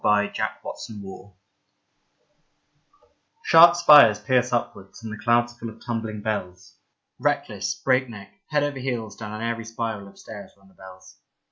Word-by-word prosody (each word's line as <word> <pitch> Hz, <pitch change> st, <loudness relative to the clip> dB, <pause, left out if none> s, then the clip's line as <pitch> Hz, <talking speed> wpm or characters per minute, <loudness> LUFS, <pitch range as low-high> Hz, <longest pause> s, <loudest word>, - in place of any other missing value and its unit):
Gothic 105 Hz, -1 st, +2 dB, 0.3 s
43 110 Hz, -2 st, -8 dB
GOTHIC 95 Hz, 0 st, -12 dB, 2.1 s
SHARP 170 Hz, +1 st, +7 dB
spires 145 Hz, -11 st, +7 dB
pierce 125 Hz, +3 st, +1 dB
upwards, 115 Hz, -3 st, -4 dB
and 110 Hz, -1 st, -6 dB
the 110 Hz, -, -10 dB
clouds 120 Hz, 0 st, +2 dB
are -, -, -26 dB
full 115 Hz, -, -6 dB
of 110 Hz, 0 st, -15 dB
tumbling 110 Hz, -3 st, -4 dB
bells. 95 Hz, -3 st, -5 dB, 0.4 s
Reckless, 100 Hz, -1 st, -2 dB
breakneck, 120 Hz, -7 st, -2 dB, 0.2 s
head 150 Hz, -2 st, 0 dB
over 145 Hz, -2 st, -3 dB
heels 120 Hz, -5 st, -4 dB
down 105 Hz, -2 st, -8 dB
an 110 Hz, +1 st, -6 dB
airy 115 Hz, 0 st, -3 dB
spiral 115 Hz, -3 st, -5 dB
of 100 Hz, -, -17 dB
stairs 105 Hz, -2 st, -11 dB
run 95 Hz, 0 st, -24 dB
the -, -, -24 dB
bells. 95 Hz, 0 st, -15 dB
110 Hz, 150 wpm, -24 LUFS, 100-120 Hz, 2.1 s, SHARP